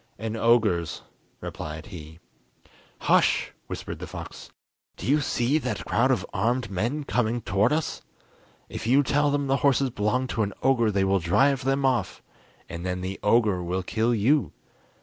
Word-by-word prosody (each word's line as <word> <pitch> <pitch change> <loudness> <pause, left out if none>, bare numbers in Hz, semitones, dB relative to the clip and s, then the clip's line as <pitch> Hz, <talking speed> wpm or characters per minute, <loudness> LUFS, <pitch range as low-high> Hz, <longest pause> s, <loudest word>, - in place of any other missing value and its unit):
"An 110 +1 -4
ogre's," 110 -8 +2 0.4
replied 75 0 -6
he. 80 -4 -10 0.8
"Hush!" - - +3 0.2
whispered - - -6
the - - -6
fox, - - -9 0.5
"do - - -7
you 145 +3 +3
see 135 +2 +1
that - - -4
crowd - - +2
of - - +1
armed 115 +3 0
men 120 +11 -1
coming 120 -3 0
towards 105 +5 +1
us? 160 - -3 0.7
If - - -6
you 135 +4 +5
tell 145 +2 +2
them 145 0 0
the 135 0 +1
horses 140 -2 +2
belong 110 +5 0
to 115 - -1
an 100 -2 -1
ogre 125 -4 +3
they 100 -2 +1
will 95 0 +2
drive 135 +11 +2
them 135 +1 +1
off, 130 -2 0 0.4
and 85 +1 -7
then 90 0 -3
the 95 +1 -5
ogre 105 -4 +3
will 90 +2 -2
kill 115 +5 0
you! 110 - +2
115 Hz, 165 wpm, -26 LUFS, 95-135 Hz, 0.8 s, you